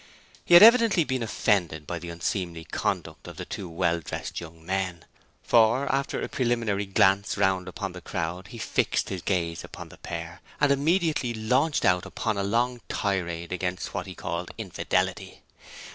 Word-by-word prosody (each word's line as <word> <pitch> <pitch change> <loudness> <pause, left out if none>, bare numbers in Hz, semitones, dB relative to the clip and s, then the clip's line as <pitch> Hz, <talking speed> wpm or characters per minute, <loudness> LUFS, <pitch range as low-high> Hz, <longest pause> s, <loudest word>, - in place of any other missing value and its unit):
He 175 - +5
had 175 - +11
evidently 230 -6 +7
been 130 -4 -2
offended 90 -8 0
by 85 +3 -4
the 85 +1 -8
unseemly 85 0 -3
conduct - - -3
of - - -10
the - - -5
two 95 - -6
well 85 +1 0
dressed 80 - -5
young 80 -1 -12
men, 90 -2 -2 0.4
for 115 +4 +4
after 140 +1 -1
a - - -3
preliminary 115 -5 0
glance 95 0 +3
round 95 -2 +1
upon 95 +1 -5
the 90 0 -10
crowd, 90 +2 -4
he 115 - -10
fixed - - 0
his 95 -2 -4
gaze 85 -3 -1
upon - - -9
the - - -14
pair, 85 +1 -7 0.2
and 145 -1 +4
immediately 150 -4 +1
launched 125 +8 +1
out 90 -1 +3
upon 110 -3 -2
a 100 - -1
long 120 +4 0
tirade 85 -4 -2
against 90 0 -3
what - - -3
he - - -8
called 85 +1 -4
'Infidelity'. - - -2
95 Hz, 170 wpm, -26 LUFS, 85-120 Hz, 0.4 s, had